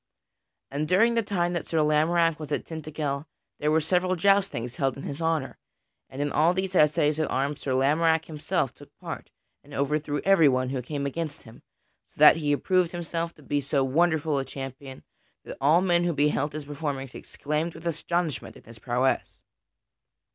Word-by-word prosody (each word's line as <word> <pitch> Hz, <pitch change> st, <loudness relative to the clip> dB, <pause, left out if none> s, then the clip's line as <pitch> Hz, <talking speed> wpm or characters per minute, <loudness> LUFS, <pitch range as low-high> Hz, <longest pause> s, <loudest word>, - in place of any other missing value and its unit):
And 145 Hz, +2 st, -2 dB
during 220 Hz, +8 st, +4 dB
the 230 Hz, -, +2 dB
time 180 Hz, -5 st, -1 dB
that 170 Hz, -, -3 dB
Sir 165 Hz, -, -2 dB
Lamorack 160 Hz, +2 st, +2 dB
was 150 Hz, -1 st, -7 dB
at -, -, -1 dB
Tintagel 155 Hz, -2 st, -4 dB, 0.3 s
there 150 Hz, -, +1 dB
were 155 Hz, +1 st, +4 dB
several 180 Hz, +3 st, +1 dB
joustings 190 Hz, -11 st, +1 dB
held 135 Hz, -2 st, 0 dB
in 135 Hz, -, -8 dB
his 140 Hz, +4 st, -6 dB
honor, 160 Hz, -4 st, -1 dB, 0.5 s
and 135 Hz, +2 st, -3 dB
in 145 Hz, -, -2 dB
all 165 Hz, +4 st, +3 dB
these 190 Hz, 0 st, -2 dB
assays 150 Hz, -1 st, +3 dB
at 155 Hz, -, 0 dB
arms 140 Hz, +2 st, -1 dB
Sir 130 Hz, -2 st, -1 dB
Lamorack 160 Hz, +4 st, +2 dB
himself 150 Hz, -2 st, -2 dB
took -, -, -17 dB
part -, -, -7 dB, 0.3 s
and 145 Hz, 0 st, -12 dB
overthrew 145 Hz, +1 st, -1 dB
everyone 140 Hz, -10 st, +4 dB
who 130 Hz, -1 st, -2 dB
came 140 Hz, +2 st, -4 dB
against 150 Hz, +1 st, -4 dB
him, 110 Hz, -, -15 dB, 0.5 s
so -, -, -31 dB
that 150 Hz, +1 st, +8 dB
he 150 Hz, -2 st, 0 dB
approved 180 Hz, +4 st, +1 dB
himself 170 Hz, -1 st, -4 dB
to 150 Hz, -, -18 dB
be 145 Hz, +1 st, -1 dB
so 140 Hz, 0 st, 0 dB
wonderful 155 Hz, +1 st, +1 dB
a -, -, -1 dB
champion 135 Hz, 0 st, -8 dB, 0.4 s
that -, -, -8 dB
all 155 Hz, +6 st, +5 dB
men 175 Hz, -2 st, +3 dB
who 175 Hz, -, +1 dB
beheld 145 Hz, 0 st, +1 dB
his 155 Hz, -1 st, -6 dB
performance 140 Hz, -3 st, -4 dB
exclaimed 150 Hz, +3 st, -4 dB
with 165 Hz, -, -11 dB
astonishment 170 Hz, -1 st, -2 dB
at -, -, -18 dB
his 115 Hz, 0 st, -14 dB
prowess. 125 Hz, +3 st, -1 dB
150 Hz, 180 wpm, -26 LUFS, 140-170 Hz, 0.5 s, that